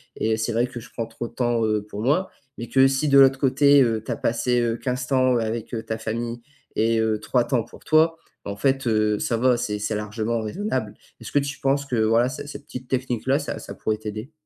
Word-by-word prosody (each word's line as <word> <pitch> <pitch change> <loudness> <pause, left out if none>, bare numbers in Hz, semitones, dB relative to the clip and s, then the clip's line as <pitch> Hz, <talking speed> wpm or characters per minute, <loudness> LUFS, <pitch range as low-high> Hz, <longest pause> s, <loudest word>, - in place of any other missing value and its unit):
et 110 0 0
c'est 110 +1 -1
vrai 120 +2 +2
que 125 -1 -8
je 120 - -13
prends 115 -2 -4
trop 115 +1 -6
de - - -16
temps, 120 -2 +1
heu, 110 -1 0
pour 105 0 -7
moi.» 150 - +1 0.3
mais 120 - -6
que 135 +2 +5
si 135 +3 0
de 140 -1 +5
l'autre 135 0 +6
côté, 140 +1 +5
heu, 115 -3 +1
tu - - -4
as - - -2
passé, 120 +1 +1
heu, 115 -1 0
15 125 0 -3
temps 130 -2 +3
avec, 115 0 -3
heu, 115 - -2
ta 110 - -3
famille 115 +2 -4 0.3
et 115 +1 +2
heu, 110 -1 +1
3 120 +3 +1
temps 125 -4 +1
pour - - -16
toi, 160 +1 +4 0.3
en 100 0 -5
fait, 135 +2 +1
heu, 110 -2 +2
ça 115 - 0
va 125 +1 +3
c'est 105 -3 -2
c'est 105 +1 -2
largement 110 +2 -2
raisonnable. 110 - -3 0.3
Est-ce - - -8
que 145 - +5
tu 140 -1 -4
penses 140 +1 +1
que 130 - -3
voilà, 115 +2 +3
ce 130 +2 -7
cette 145 0 -9
petite 125 -1 -9
technique 125 -3 -2
là, 135 +2 +3
ça 145 - -5
ça - - -8
pourrait 110 0 -1
t'aider? 110 +5 -7
120 Hz, 245 wpm, -24 LUFS, 110-135 Hz, 0.3 s, l'autre